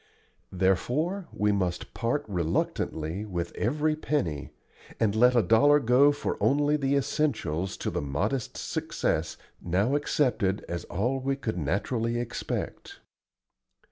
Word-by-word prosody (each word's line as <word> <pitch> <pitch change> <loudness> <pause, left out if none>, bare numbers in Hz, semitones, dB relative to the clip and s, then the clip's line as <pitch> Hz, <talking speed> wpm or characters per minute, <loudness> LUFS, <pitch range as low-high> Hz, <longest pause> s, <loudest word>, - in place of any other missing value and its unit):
Therefore 130 - 0
we 105 0 +1
must 90 -3 -2
part 125 +5 -1
reluctantly 85 -1 -1
with 90 -5 -4
every 150 +6 0
penny, 95 - -2 0.5
and 105 -3 +2
let 125 +3 +5
a 120 - +5
dollar 145 +7 +5
go 130 +3 +5
for 145 - -3
only 145 +2 +3
the 140 -1 +1
essentials 125 - -1
to - - -3
the - - -2
modest 75 - -2
success - - -2 0.2
now 95 +9 +1
accepted 125 -9 +1
as 85 0 -4
all 125 +9 -1
we 135 +1 -1
could 110 -8 -3
naturally 115 - -1
expect. 120 - -5
115 Hz, 125 wpm, -28 LUFS, 95-140 Hz, 0.5 s, let